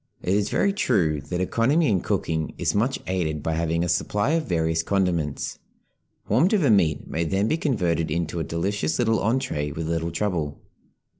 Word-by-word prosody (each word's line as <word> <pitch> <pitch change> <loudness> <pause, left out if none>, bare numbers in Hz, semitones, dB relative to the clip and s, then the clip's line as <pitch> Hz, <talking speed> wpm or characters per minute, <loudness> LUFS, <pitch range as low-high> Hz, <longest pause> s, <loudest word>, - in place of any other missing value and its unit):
It 90 - +1
is 105 +1 +1
very 200 - +2
true 85 - +1
that 90 0 -1
economy 135 - +2
in 95 -7 +2
cooking 80 -1 -2
is - - 0
much 120 +6 +1
aided 80 -5 -2
by 80 - -1
having 85 +1 0
a - - -1
supply 105 - 0
of 165 -1 0
various 80 -2 +1
condiments; 85 -5 -1 0.7
warmed 160 - +3
over 155 - +3
meat 80 -8 +2
may 85 - -1
then 95 +5 0
be 155 - +2
converted 90 - 0
into 85 +1 -2
a - - -1
delicious 85 +1 -1
little 115 -2 +2
entrée 105 - -1
with 80 0 -3
little 85 0 -1
trouble. 85 -5 -2
90 Hz, 175 wpm, -24 LUFS, 80-110 Hz, 0.7 s, warmed